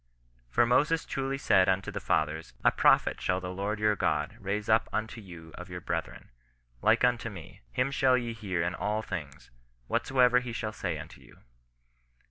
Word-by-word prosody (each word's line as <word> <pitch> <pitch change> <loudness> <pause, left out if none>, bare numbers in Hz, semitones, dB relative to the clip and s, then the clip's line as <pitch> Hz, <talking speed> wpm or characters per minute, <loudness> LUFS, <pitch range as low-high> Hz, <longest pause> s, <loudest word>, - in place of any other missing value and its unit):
For 120 - +3
Moses 150 +7 +2
truly 135 0 -2
said 95 -8 +4
unto 95 +1 0
the - - -4
fathers, 80 -3 -1
a - - +6
Prophet - - +3
shall 90 - +1
the 90 0 -5
Lord 100 +3 -2
your 105 0 +3
God - - 0
raise 105 +2 -3
up 110 +1 +3
unto 110 +1 -3
you 85 -4 -11
of 90 +1 -9
your 90 0 -5
brethren, - - -5 0.5
like 110 +2 +3
unto 120 -1 +2
me; 90 -7 -11
him 125 +2 0
shall 135 -2 +3
ye 120 -2 -3
hear 95 -6 -2
in 85 +1 -1
all 105 +4 -2
things, 75 - -7 0.3
whatsoever 125 - +3
he 125 -1 -6
shall 110 -1 -3
say 90 -6 -3
unto 75 - -10
you. - - -19
105 Hz, 180 wpm, -29 LUFS, 90-120 Hz, 0.5 s, a